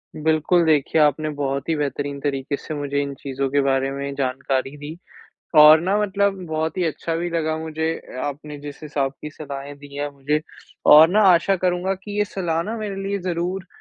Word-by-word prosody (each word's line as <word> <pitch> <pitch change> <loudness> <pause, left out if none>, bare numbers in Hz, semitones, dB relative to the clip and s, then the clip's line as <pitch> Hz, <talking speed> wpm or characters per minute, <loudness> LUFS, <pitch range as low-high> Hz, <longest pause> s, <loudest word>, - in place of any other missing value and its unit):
बिल्कुल 160 +3 +2
देखिए, 155 0 +3
आपने 150 +1 +2
बहुत 140 +1 -2
ही 160 - +2
बेहतरीन 145 -1 -3
तरीके 140 0 -2
से 155 - -7
मुझे 145 -1 -1
इन 140 0 -4
चीज़ों 135 0 -3
के 140 +1 +2
बारे 135 0 +1
में 140 0 -4
जानकारी 135 0 -2
दी, 150 +3 -8 0.6
और 155 +1 +9
ना 190 +4 +1
मतलब 200 -1 0
बहुत 160 0 -2
ही 180 - +1
अच्छा 165 +1 -2
भी 175 +1 -2
लगा 160 -1 -1
मुझे 160 0 -5
ए 165 - -6
आपने 145 +1 -6
जिस 145 0 -9
हिसाब 140 -3 -2
की 150 - -6
सलाहें 140 -1 -8
दी 140 0 -13
हैं 145 0 -2
मुझे, 145 +2 -1 0.5
और 155 +2 +9
ना 210 +3 +3
आशा 185 +2 +4
करूँगा 180 +1 0
कि 205 +1 -7
ये 210 - +3
सलाह 170 -5 -2
ना 220 +4 -4
मेरे 205 -3 -4
लिए 200 +1 -2
ज़रूर 180 +1 -3
155 Hz, 195 wpm, -22 LUFS, 140-175 Hz, 0.6 s, और